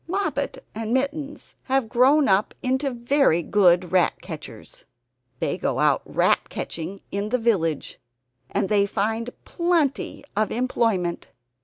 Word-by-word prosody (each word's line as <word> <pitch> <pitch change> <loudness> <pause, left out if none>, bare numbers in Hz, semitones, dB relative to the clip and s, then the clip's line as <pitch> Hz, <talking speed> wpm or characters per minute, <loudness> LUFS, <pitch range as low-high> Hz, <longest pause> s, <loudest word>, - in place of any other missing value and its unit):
Moppet 390 +3 -2
and 225 +2 -2
Mittens 285 +2 -3
have 265 -3 +1
grown 265 +5 +4
up 195 +2 +2
into 265 +2 0
very 240 - +2
good 180 -3 +3
rat 185 -2 +2
catchers. 155 - -10 0.6
They - - -1
go - - -1
out - - +3
rat - - +1
catching 170 +4 -5
in 200 +1 -2
the 250 - +1
village, 180 - 0 0.5
and - - 0
they 200 -1 +2
find 220 +4 -1 0.2
plenty 340 -6 0
of 215 +1 +1
employment. 225 -8 0
225 Hz, 130 wpm, -24 LUFS, 190-270 Hz, 0.6 s, grown